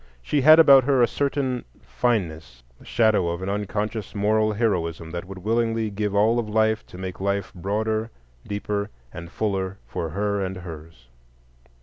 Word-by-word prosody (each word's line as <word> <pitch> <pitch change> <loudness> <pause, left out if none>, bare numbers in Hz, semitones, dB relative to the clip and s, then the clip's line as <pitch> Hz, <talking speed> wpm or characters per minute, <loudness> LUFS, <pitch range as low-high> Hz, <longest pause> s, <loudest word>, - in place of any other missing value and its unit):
She 145 - +1
had 155 +4 +8
about 140 -5 +7
her 135 -3 +4
a - - +5
certain 135 -1 -1 0.2
fineness, 80 - -2 0.2
the - - -17
shadow 110 -6 +2
of 85 +2 -4
an 95 - -3
unconscious 105 +1 -3
moral 110 +1 +2
heroism 85 -7 -1
that 85 +1 -5
would 95 +1 -9
willingly 115 +2 0
give 105 0 -2
all 110 +4 +3
of 110 -2 -3
life 110 0 +2
to - - -12
make 95 0 -6
life 100 -1 -1
broader, 110 +4 -2 0.4
deeper, 100 0 -3 0.2
and 85 +1 -8
fuller 95 -1 -2
for 80 +6 -4
her 100 +4 -1
and 95 0 -4
hers. 80 -7 -10
105 Hz, 160 wpm, -24 LUFS, 95-110 Hz, 0.4 s, had